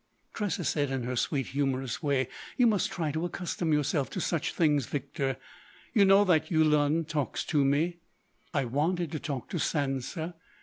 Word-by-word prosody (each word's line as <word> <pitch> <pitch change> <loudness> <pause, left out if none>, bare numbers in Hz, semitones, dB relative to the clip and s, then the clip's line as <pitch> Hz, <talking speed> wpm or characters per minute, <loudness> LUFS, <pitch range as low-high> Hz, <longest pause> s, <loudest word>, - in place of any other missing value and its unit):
Tressa 205 -5 -2
said 145 -2 0
in 135 -2 -2
her 125 +1 -2
sweet, 135 +2 0
humorous 135 -2 -1
way: 140 -5 +1 0.3
"You 250 - +5
must 215 -4 +2
try 160 -3 -1
to 160 +3 -2
accustom 175 -1 -2
yourself 150 -1 +1
to - - -4
such 170 -3 -1
things, 150 -6 +2
Victor. 135 -1 -2 0.6
You 205 -4 +6
know 195 +1 +7
that 160 -4 +3
Yulun 155 -1 +3
talks 150 -3 -2
to 150 -4 +2
me.... 155 +6 +1 0.5
I 140 -5 0
wanted 155 +6 0
to 155 - -3
talk 140 -4 -4
to 180 - -2
Sansa. 150 +3 -2
150 Hz, 170 wpm, -29 LUFS, 135-170 Hz, 0.6 s, know